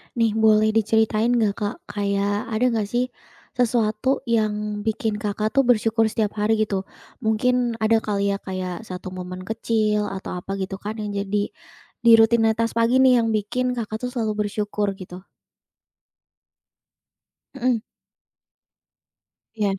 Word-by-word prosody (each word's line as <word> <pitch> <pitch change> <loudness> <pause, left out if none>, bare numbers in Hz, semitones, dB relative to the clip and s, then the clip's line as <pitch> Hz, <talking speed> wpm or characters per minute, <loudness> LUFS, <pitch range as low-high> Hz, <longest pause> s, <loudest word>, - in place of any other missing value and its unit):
Nih 230 -1 +2
boleh 215 0 +5
diceritain 220 0 +2
nggak 220 -4 +2
Kak, 205 +2 -2
kayak 205 0 -1
ada 225 +2 -1
nggak 220 -3 0
sih, 245 +4 -1 0.5
sesuatu 235 +1 +1
yang 210 -2 0
bikin 220 -1 -1
Kakak 210 0 -2
tuh 270 +3 +2
bersyukur 225 -1 +3
setiap 215 -1 -2
hari 210 +2 +2
gitu. 195 -2 -2 0.3
Mungkin 245 +1 +1
ada 225 +1 +4
kali 200 -2 -1
ya 200 - -1
kayak 185 +2 -5
1 185 0 -7
momen 185 0 -7
kecil 215 0 0
atau 190 -2 -5
apa 195 +2 -5
gitu 195 0 -4
kan 210 +1 -5
yang 205 - -4
jadi 205 +1 -1 0.5
di 235 - +7
rutinitas 225 0 +4
pagi 245 +3 +4
nih 255 -2 +6
yang 225 -1 0
bikin 250 +5 -1
Kakak 220 0 -4
tuh 250 - -4
selalu 215 -3 -1
bersyukur 205 -1 -2
gitu. 185 0 -11 2.3
Mhm. 250 -1 +1 1.8
Iya. 205 -3 -1
215 Hz, 135 wpm, -23 LUFS, 205-230 Hz, 2.3 s, di